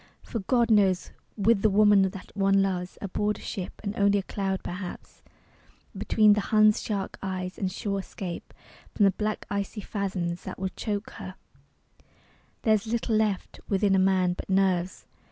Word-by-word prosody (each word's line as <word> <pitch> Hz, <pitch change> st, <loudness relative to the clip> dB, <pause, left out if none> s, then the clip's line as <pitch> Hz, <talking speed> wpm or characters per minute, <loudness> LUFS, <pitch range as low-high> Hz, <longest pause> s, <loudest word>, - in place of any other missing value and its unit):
For 230 Hz, -, -4 dB
God 235 Hz, +3 st, +2 dB
knows, 195 Hz, -4 st, +3 dB, 0.3 s
with 210 Hz, 0 st, +3 dB
the 215 Hz, -, +4 dB
woman 205 Hz, 0 st, +5 dB
that 190 Hz, 0 st, -11 dB
one 195 Hz, 0 st, +3 dB
loves 180 Hz, -2 st, -3 dB
Aboard 210 Hz, +2 st, -1 dB
a -, -, -13 dB
ship, 185 Hz, -2 st, -6 dB
and 205 Hz, 0 st, -3 dB
only 200 Hz, 0 st, +3 dB
a 195 Hz, -, -1 dB
cloud 195 Hz, -1 st, -3 dB
perhaps 180 Hz, 0 st, -7 dB, 0.7 s
Between 215 Hz, -1 st, +4 dB
the 210 Hz, -, +1 dB
Hun's 215 Hz, 0 st, +4 dB
shark 200 Hz, -3 st, -3 dB
eyes 185 Hz, -1 st, -4 dB
and 190 Hz, -2 st, -1 dB
sure 200 Hz, +1 st, -2 dB
escape 185 Hz, -2 st, -7 dB, 0.4 s
From 210 Hz, -, +3 dB
the 195 Hz, -, +5 dB
black 215 Hz, +2 st, -3 dB
icy 200 Hz, +1 st, -3 dB
fathoms 185 Hz, -4 st, -3 dB
that -, -, -7 dB
would 190 Hz, 0 st, -4 dB
choke 205 Hz, 0 st, -3 dB
her, -, -, -7 dB, 1.3 s
There's 215 Hz, -1 st, +2 dB
little 230 Hz, 0 st, 0 dB
left 215 Hz, -3 st, -1 dB
within 200 Hz, 0 st, +2 dB
a 190 Hz, -, +4 dB
man 185 Hz, -1 st, +3 dB
but 180 Hz, -, -8 dB
nerves. 190 Hz, -2 st, +1 dB
200 Hz, 165 wpm, -27 LUFS, 190-210 Hz, 1.3 s, woman